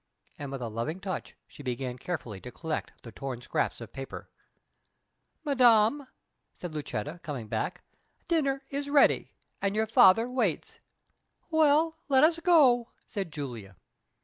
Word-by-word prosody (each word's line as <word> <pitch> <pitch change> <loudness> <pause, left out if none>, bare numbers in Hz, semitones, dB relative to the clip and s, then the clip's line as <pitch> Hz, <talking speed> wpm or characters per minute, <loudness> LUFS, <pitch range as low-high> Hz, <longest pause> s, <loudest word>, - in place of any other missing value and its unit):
And 145 -2 -6
with 135 -2 -5
a - - -2
loving 115 - -4
touch 190 -1 -5
she - - -13
began 125 -1 -4
carefully 120 - -5
to 125 - -9
collect 160 +3 -5
the 115 - -10
torn 130 +1 -5
scraps 125 - -2
of 115 -2 -10
paper. 135 -1 -8 1.1
"Madam," 255 -1 +4 0.5
said 175 -3 -7
Lucetta, 150 +2 -4
coming 135 -8 -6
back, - - -3 0.4
"dinner 275 -5 +1
is 280 +1 -3
ready, 285 -1 +4 0.3
and 200 0 0
your 220 +1 +2
father 225 +1 +6
waits." 255 +1 -2 0.7
"Well, 315 +1 +3
let 265 0 +5
us 325 +1 +4
go," 275 -9 +4 0.2
said 195 -7 -5
Julia. 120 -10 -7
185 Hz, 140 wpm, -29 LUFS, -, 1.1 s, father